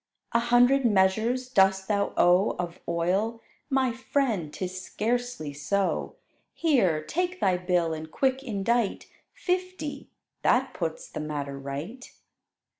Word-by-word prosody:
"A 235 - +3
hundred 245 +3 +4
measures 220 +4 +2
dost 190 -5 +3
thou 200 -1 +1
owe 180 +3 +4
Of 175 -1 -4
oil? 190 +7 0 0.3
My 265 -2 +2
friend, 230 - -1
'tis 185 +1 -5
scarcely 235 -8 -2
so: 190 +8 -1 0.4
Here, 195 - +2
take 360 - -2
thy 185 -2 +3
bill 180 -2 +1
and 160 0 -6
quick 265 +7 0
indite 230 -1 0 0.3
Fifty: 365 -4 -3 0.3
that - - +2
puts - - -4
the - - -7
matter 145 -2 -4
right." 145 - -6
205 Hz, 120 wpm, -27 LUFS, 175-255 Hz, 0.4 s, hundred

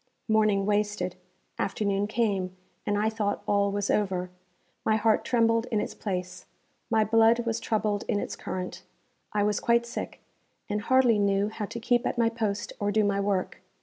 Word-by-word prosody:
Morning 215 -3 +3
wasted. 205 -3 0 0.4
Afternoon 200 0 0
came, 195 -5 -1 0.3
and 205 - +1
I 210 +1 +2
thought 215 -2 -1
all 200 -1 +2
was 200 0 -1
over. 185 -3 0 0.5
My 220 - +3
heart 220 0 +2
trembled 230 -1 +2
in 220 -4 0
its - - -3
place. 180 -2 -5 0.4
My 220 -1 +3
blood 225 +2 +4
was 230 0 -1
troubled 210 -2 0
in 205 - +1
its - - -4
current. 180 0 -5 0.5
I 205 -1 +1
was 210 0 +1
quite 235 0 +2
sick, 235 - -6 0.5
and 210 0 -1
hardly 250 -2 +4
knew 200 0 +2
how 220 -1 -4
to 235 - -6
keep 240 +2 +1
at - - -2
my 230 -1 +3
post 215 -3 -3
or 205 0 0
do 215 +1 +3
my 200 -1 +1
work. 200 -2 -1
210 Hz, 175 wpm, -27 LUFS, 200-225 Hz, 0.5 s, blood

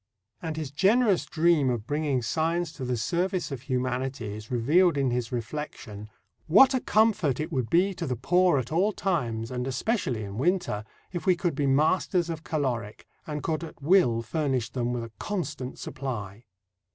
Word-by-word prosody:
And 160 -2 -4
his 155 -4 -4
generous 200 - +3
dream 160 -4 +3
of 120 -4 -2
bringing 145 -2 0
science 165 +6 0
to 140 - -8
the 125 -1 -1
service 180 - -1
of 135 -3 -5
humanity 130 -3 -2
is 110 0 -9
revealed 150 +8 +3
in 135 -3 +1
his 120 -2 -2
reflection: 115 -4 -6 0.4
What 260 - +7
a 260 - +2
comfort 215 - +2
it 155 - -3
would 125 -4 -1
be 185 +4 +3
to 170 -3 -5
the 125 - -1
poor 175 +6 +3
at 125 0 -3
all 190 +7 +2
times, 120 - -1
and 125 0 -3
especially 130 - -1
in 100 +2 -6
winter, 145 - 0 0.3
if 175 - -4
we 185 - +5
could 175 -1 -1
be 145 0 0
masters 170 +5 +2
of 160 -1 -6
caloric, 120 -10 -3 0.2
and 150 -2 -4
could 160 0 -1
at 165 - -9
will 140 -7 +3
furnish 135 -3 -1
them 120 -2 -1
with 120 -1 -2
a 115 - -8
constant 150 -10 -4
supply! 115 -5 -6
145 Hz, 175 wpm, -27 LUFS, 125-175 Hz, 0.4 s, What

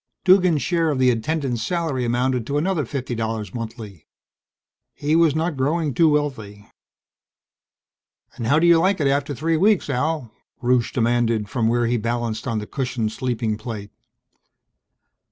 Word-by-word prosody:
Duggan's 180 -5 +4
share 165 -2 +1
of 145 - 0
the 130 -1 +4
attendants' 130 0 -2
salary 155 -3 -1
amounted 125 0 0
to 145 - -1
another 165 -1 0
fifty 130 0 -4
dollars 110 -1 -3
monthly. 110 -6 -8 0.9
He 150 +2 0
was 165 -3 +4
not 160 0 -1
growing 145 +2 0
too 165 +2 +4
wealthy! 120 -9 -2 1.7
"And 115 - -5
how 140 +5 +4
do 165 - +3
you 170 -1 +6
like 190 +2 +2
it 145 - 0
after 140 +1 0
three 160 +4 0
weeks, 195 -3 +2
Al?" 140 -2 -1 0.3
Rusche 125 -2 +1
demanded 115 -3 +1
from 115 -1 0
where 120 +1 +2
he 120 +1 +1
balanced 115 +1 -3
on 115 -3 -1
the 105 - -3
cushioned 125 -3 -2
sleeping 115 -3 -2
plate. 110 -3 -7
130 Hz, 155 wpm, -22 LUFS, 115-155 Hz, 1.7 s, you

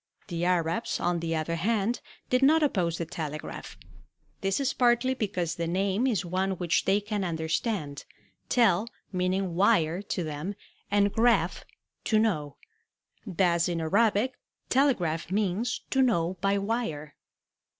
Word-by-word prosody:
The 170 -1 -2
Arabs, 175 +4 0
on 175 0 0
the 165 0 -2
other 160 +1 -2
hand, 220 +5 0 0.3
did 255 +1 +3
not 310 +4 +5
oppose 180 - +1
the 170 - -3
telegraph. 155 -2 -6 0.6
This 195 +3 0
is 275 - 0
partly 245 +1 +3
because 190 -8 -2
the 170 0 -3
name 195 +7 +1
is 210 -7 0
one 190 +2 0
which 175 -2 0
they 195 +2 +3
can 205 -1 -3
understand, 160 - -2 0.4
tel 220 -4 +3 0.2
meaning 185 0 0
wire 180 -2 +3
to 195 -3 -3
them, 155 +6 -4 0.3
and 205 0 +2
araph, 235 +1 +2 0.4
to 220 - +3
know. 155 -11 0 0.7
Thus 175 -2 +2
in 170 -1 -1
Arabic 210 +8 +2 0.4
tele 270 0 +4
agraph 165 -2 -3
means 205 +4 -1
to 265 - +3
know 185 -8 +2
by 200 +1 +2
wire. 195 -9 -3
190 Hz, 140 wpm, -28 LUFS, 170-225 Hz, 0.7 s, not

